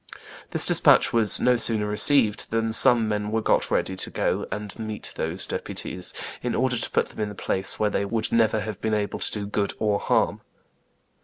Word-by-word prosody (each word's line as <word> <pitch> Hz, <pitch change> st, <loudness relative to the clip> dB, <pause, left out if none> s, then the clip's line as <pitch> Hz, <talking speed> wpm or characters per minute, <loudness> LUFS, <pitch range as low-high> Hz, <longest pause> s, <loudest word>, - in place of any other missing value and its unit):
This -, -, +2 dB
despatch -, -, +4 dB
was 115 Hz, -3 st, +4 dB
"no 125 Hz, 0 st, +2 dB
sooner 110 Hz, -3 st, +2 dB
received 105 Hz, +1 st, +3 dB
than 115 Hz, 0 st, -2 dB
some 115 Hz, 0 st, +4 dB
men 105 Hz, -1 st, -3 dB
were 110 Hz, -, 0 dB
got 110 Hz, -, 0 dB
ready 95 Hz, -, -1 dB
to -, -, -1 dB
go -, -, -2 dB
and 105 Hz, 0 st, -7 dB
meet 110 Hz, -1 st, -5 dB
those 85 Hz, +4 st, -2 dB
deputies, 90 Hz, 0 st, -4 dB, 0.3 s
in 120 Hz, -, -3 dB
order 130 Hz, 0 st, 0 dB
to 115 Hz, -, +1 dB
put -, -, -1 dB
them -, -, -14 dB
in 105 Hz, -1 st, -2 dB
a 105 Hz, -, -10 dB
place 95 Hz, 0 st, +1 dB
where 105 Hz, -1 st, 0 dB
they -, -, -1 dB
would 110 Hz, +2 st, -1 dB
never 110 Hz, -2 st, +1 dB
have 105 Hz, -2 st, -7 dB
been 110 Hz, -1 st, -1 dB
able 105 Hz, -1 st, -3 dB
to -, -, +2 dB
do 105 Hz, -1 st, -4 dB
good 100 Hz, 0 st, -3 dB
or 105 Hz, -2 st, -1 dB
harm." -, -, 0 dB
110 Hz, 205 wpm, -23 LUFS, 105-115 Hz, 0.3 s, despatch